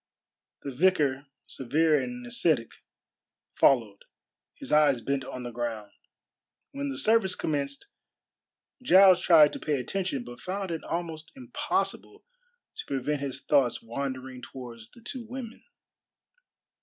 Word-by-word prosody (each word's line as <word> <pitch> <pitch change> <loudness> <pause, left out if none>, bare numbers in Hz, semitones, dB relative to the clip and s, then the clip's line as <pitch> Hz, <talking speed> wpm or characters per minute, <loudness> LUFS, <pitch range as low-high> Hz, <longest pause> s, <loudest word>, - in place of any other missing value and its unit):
The 140 - -4
vicar, 145 -3 +2 0.2
severe 150 +4 +1
and 245 0 -6
ascetic, 165 - +1 0.8
followed, 110 -7 +2 0.5
his - - -8
eyes 150 -4 +4
bent 135 +3 -2
on 130 -1 -7
the 120 - -6
ground. 115 -3 -4 0.8
When 140 0 -4
the 135 - -5
service 215 -2 +2
commenced 140 -2 -3 1.0
Giles 190 -5 +6
tried 155 -4 +6
to - - -6
pay 145 -3 -1
attention, 160 0 -3
but 120 0 -11
found 190 0 -4
it 165 - -4
almost 165 -2 -5
impossible 255 -2 -3 0.5
to 445 - -6
prevent 140 +2 -2
his 135 -1 -4
thoughts 135 -5 +2
wandering 130 +1 -5
towards 120 -4 -10
the 235 - -18
two 245 +1 -6
women. 245 -2 -7
145 Hz, 125 wpm, -28 LUFS, 130-185 Hz, 1.0 s, Giles